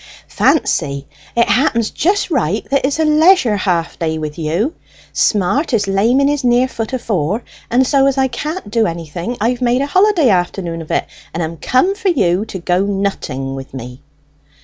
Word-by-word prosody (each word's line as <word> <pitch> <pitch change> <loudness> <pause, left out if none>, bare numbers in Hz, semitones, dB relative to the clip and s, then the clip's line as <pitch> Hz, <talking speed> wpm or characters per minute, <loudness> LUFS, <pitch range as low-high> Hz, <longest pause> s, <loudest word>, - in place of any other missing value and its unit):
"Fancy! 140 0 +1 0.3
it 235 0 +3
happens 235 -4 +1
just 385 +3 0
right 215 - 0
that 275 - +4
it - - +3
is 280 - -2
a 320 - +3
leisure 305 - +4
half 180 -4 -1
day 160 -1 -1
with 155 +1 -5
you. 170 - -1 0.4
Smart 240 - +1
is 205 -3 0
lame 210 +7 +2
in 280 - +3
his 290 -1 0
near 245 +1 +3
foot 225 -4 -5
afore, 215 - -1 0.3
and 255 +2 +3
so, 275 0 +3
as 275 -1 0
I 265 0 +3
can't 300 - -5
do 225 -1 +2
anything, 170 +7 -5
I've 240 +4 0
made 250 +2 +2
a - - 0
holiday 370 - +3
afternoon 175 -3 -1
of 160 - -11
it, - - 0 0.3
and 170 - -1
am 165 +1 -5
come 255 - +2
for 400 -1 -1
you 195 - +1
to 200 - -7
go 180 +1 0
nutting 195 -10 -2
with 135 0 -8
me!" 125 +1 -8
220 Hz, 190 wpm, -16 LUFS, 170-270 Hz, 0.4 s, that